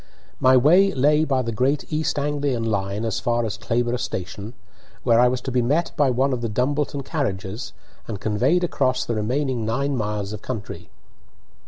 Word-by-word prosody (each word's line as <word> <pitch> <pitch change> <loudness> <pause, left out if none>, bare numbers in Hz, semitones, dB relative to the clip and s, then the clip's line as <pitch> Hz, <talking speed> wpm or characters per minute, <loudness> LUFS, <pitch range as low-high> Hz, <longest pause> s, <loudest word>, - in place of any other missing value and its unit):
My 130 0 +6
way 180 +10 +5
lay 150 +3 +3
by 135 -4 +1
the 115 - -3
Great 130 +6 0
East 155 -1 0
Anglian 145 -4 -1
line 100 0 -1
as 110 -1 -1
far 120 +1 0
as 105 - -3
Clayborough 120 +1 -1
station, 100 0 -5 0.5
where 115 -1 +4
I 125 - +6
was 125 0 -1
to 130 - -4
be 125 0 +2
met 150 +8 +1
by 145 -2 +3
one 130 +2 +1
of 120 - -2
the 115 - -2
Dumbleton 140 +5 -1
carriages 110 - -3 0.4
and 105 -4 -5
conveyed 125 - +1
across 130 -6 0
the 120 - -2
remaining 125 +3 -1
nine 135 +6 -1
miles 105 -3 -2
of 105 - -7
country. 115 -6 -6
125 Hz, 180 wpm, -23 LUFS, 110-140 Hz, 0.5 s, My